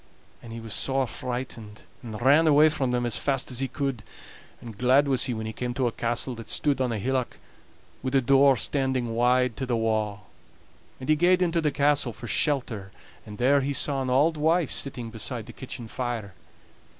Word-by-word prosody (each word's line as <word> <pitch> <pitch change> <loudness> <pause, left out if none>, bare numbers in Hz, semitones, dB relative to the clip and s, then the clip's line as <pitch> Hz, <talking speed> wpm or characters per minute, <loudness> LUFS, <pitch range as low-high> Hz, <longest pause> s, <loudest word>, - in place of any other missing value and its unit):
And 115 - -11
he 115 - -6
was 115 -1 -6
sore 135 0 +1
frightened, 120 -4 -6 0.2
and 110 -4 -7
ran 145 +6 +5
away 150 +1 +6
from 135 -4 -1
them 125 0 0
as 115 -3 +1
fast 135 0 -1
as 125 - -3
he 135 - -1
could; 135 -4 -3 0.6
and 115 -3 -10
glad 130 +6 +3
was 130 -3 +2
he 125 - -2
when 110 0 -4
he 110 - -5
came 120 +1 -4
to 130 - 0
a 120 - +1
castle 115 0 -1
that - - -13
stood 140 -3 0
on 125 -2 0
a 115 - -2
hillock, 130 +3 -2 0.6
wi' 130 - -2
the 135 +1 +3
door 135 +1 +4
standing 130 -2 -1
wide 125 0 +2
to 130 - -3
the 120 -2 0
wa'. 110 -2 -1 0.8
And 130 - -8
he 155 - +4
gaed 180 +3 +3
into 170 -1 +1
the 155 - +1
castle 140 -3 +1
for 120 - -10
shelter, 120 -9 -1 0.4
and 105 -1 -9
there 140 +4 +3
he 140 +1 -2
saw 140 0 +1
an 130 - -2
auld 150 +5 +3
wife 160 +1 +2
sitting 125 -4 -2
beside 115 +1 -4
the - - -11
kitchen 125 -3 -8
fire. 115 -4 -4
130 Hz, 205 wpm, -26 LUFS, 115-140 Hz, 0.8 s, away